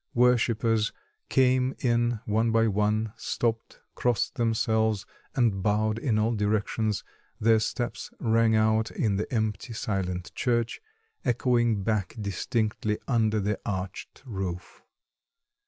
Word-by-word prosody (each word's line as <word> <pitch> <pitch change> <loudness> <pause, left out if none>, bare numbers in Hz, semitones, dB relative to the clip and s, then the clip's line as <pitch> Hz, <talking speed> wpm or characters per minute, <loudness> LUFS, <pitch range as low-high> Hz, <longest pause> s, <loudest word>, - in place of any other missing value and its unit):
Worshippers 115 -3 +3 0.4
came 130 0 +3
in 120 -2 +1
one 110 +2 +1
by 115 0 +4
one, 105 +1 0
stopped, 115 0 -2
crossed 120 -2 0
themselves, 110 -4 +1 0.3
and 115 -7 +2
bowed 110 +2 +1
in 115 -4 +1
all 110 +2 +2
directions; 105 0 0 0.4
their 110 0 +4
steps 120 +2 -3
rang 115 -1 +3
out 110 +1 +3
in 100 -4 0
the 105 - -3
empty, 110 0 -1
silent 90 -5 -3
church, 120 -2 0 0.4
echoing 120 -4 +2
back 105 -1 -1
distinctly 105 +1 -1
under 110 -4 +2
the 105 +1 -1
arched 95 +3 -5
roof. 95 -6 -5
110 Hz, 115 wpm, -27 LUFS, 105-120 Hz, 0.4 s, by